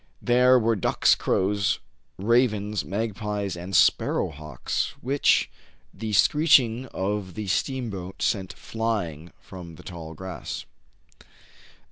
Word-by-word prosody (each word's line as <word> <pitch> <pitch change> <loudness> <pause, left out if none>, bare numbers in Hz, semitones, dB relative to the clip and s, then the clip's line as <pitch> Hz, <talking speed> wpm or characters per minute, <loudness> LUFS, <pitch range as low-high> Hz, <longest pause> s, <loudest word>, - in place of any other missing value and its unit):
There 125 +1 +5
were 115 -1 +2
ducks, 100 - +3
crows, 100 +1 +1 0.4
ravens, 105 -1 +1
magpies, 105 -2 -3
and 90 +2 -5
sparrow - - +3
hawks, 75 -3 -4
which 135 +3 +2 0.5
the 110 -1 -5
screeching 130 - +4
of 95 -2 -3
the 110 -1 -4
steam 120 +5 -1
boat 95 -1 -6
sent 95 -4 0
flying 95 -9 -3
from 90 -3 -10
the - - -14
tall 80 -3 -8
grass. 95 +1 -6
105 Hz, 110 wpm, -25 LUFS, 95-115 Hz, 0.5 s, There